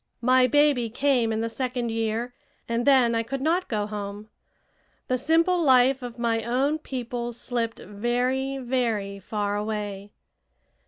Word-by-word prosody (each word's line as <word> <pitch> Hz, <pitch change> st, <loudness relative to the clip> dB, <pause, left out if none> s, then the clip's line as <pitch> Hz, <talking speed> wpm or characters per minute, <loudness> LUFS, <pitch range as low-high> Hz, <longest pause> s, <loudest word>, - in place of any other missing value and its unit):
My 255 Hz, +1 st, +5 dB
baby 285 Hz, -3 st, +3 dB
came 245 Hz, -1 st, +1 dB
in 220 Hz, 0 st, -1 dB
the 230 Hz, -, -1 dB
second 245 Hz, 0 st, -2 dB
year, 225 Hz, +2 st, -2 dB, 0.3 s
and 235 Hz, +2 st, -1 dB
then 255 Hz, -4 st, +5 dB
I 230 Hz, -, +1 dB
could 270 Hz, +4 st, -4 dB
not 335 Hz, +6 st, +1 dB
go 210 Hz, -4 st, -1 dB
home. 205 Hz, 0 st, -6 dB, 0.8 s
The 255 Hz, -, +2 dB
simple 330 Hz, +7 st, +2 dB
life 260 Hz, -2 st, +4 dB
of 245 Hz, -1 st, -7 dB
my 230 Hz, -1 st, 0 dB
own 270 Hz, +6 st, 0 dB
people 240 Hz, -4 st, -4 dB
slipped 230 Hz, -1 st, -3 dB
very, 250 Hz, +5 st, -1 dB
very 230 Hz, -6 st, -1 dB
far 205 Hz, +1 st, -2 dB
away. 205 Hz, -1 st, -4 dB
240 Hz, 145 wpm, -25 LUFS, 220-260 Hz, 0.8 s, My